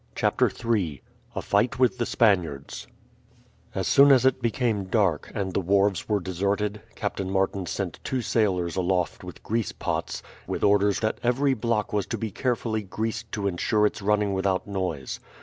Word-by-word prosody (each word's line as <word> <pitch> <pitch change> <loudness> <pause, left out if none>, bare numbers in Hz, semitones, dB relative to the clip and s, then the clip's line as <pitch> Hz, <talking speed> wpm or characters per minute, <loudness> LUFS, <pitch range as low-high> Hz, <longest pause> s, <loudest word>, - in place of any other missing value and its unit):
CHAPTER - - +2
III 95 - -1 0.3
A - - -3
FIGHT 110 +6 +1
WITH 125 0 +2
THE 120 - 0
SPANIARDS 90 - +1 0.9
As 95 -1 -1
soon 140 0 +7
as 130 -2 +5
it 130 0 +3
became 115 -4 0
dark, 95 -5 +1
and 95 -3 -2
the - - +1
wharves 100 +1 +1
were 105 -1 +2
deserted, 100 +3 -1
Captain 95 -1 -3
Martin 95 -1 0
sent - - -3
two 130 -2 -2
sailors 90 -8 +1
aloft 90 -3 0
with - - -10
grease 115 -3 -1
pots, - - -3 0.2
with - - -3
orders 100 0 +3
that 110 0 -1
every 135 +3 +2
block 115 -3 -1
was 105 -2 0
to - - -3
be 110 -2 -4
carefully 115 -1 -1
greased 110 +2 -4
to 105 -2 -2
ensure 105 +3 +1
its 105 - -1
running 105 0 +1
without 95 -1 0
noise. 90 -9 -3
105 Hz, 165 wpm, -26 LUFS, 95-115 Hz, 0.9 s, soon